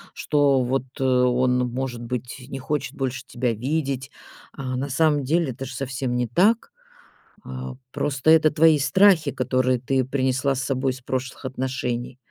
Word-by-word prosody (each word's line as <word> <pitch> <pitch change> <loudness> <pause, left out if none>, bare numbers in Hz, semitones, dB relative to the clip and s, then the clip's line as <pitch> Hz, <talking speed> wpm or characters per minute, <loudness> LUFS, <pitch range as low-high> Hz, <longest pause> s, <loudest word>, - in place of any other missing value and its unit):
что 140 -3 +2
вот 130 +1 -3
он, 125 -1 +2
может 125 -2 -4
быть, 125 +2 -5
не 135 - -5
хочет 140 0 -3
больше 130 -1 -3
тебя 120 -1 -1
видеть. 135 +2 -2 0.4
А 130 -2 -4
на 135 +2 -3
самом 150 0 +2
деле, 155 0 +1
это 135 +3 -7
ж 130 - -8
совсем 130 -1 -3
не 125 -1 0
так. 220 - +2 0.7
А 130 0 -6 0.2
просто 145 +1 0
это 155 -1 +6
твои 155 0 +5
страхи, 160 +1 +4
которые 130 -1 +1
ты 130 0 0
принесла 130 +1 0
с 130 - -3
собой 130 0 0
из 130 - -10
прошлых 130 +2 -4
отношений. 125 -1 -3
130 Hz, 155 wpm, -23 LUFS, 125-140 Hz, 0.7 s, это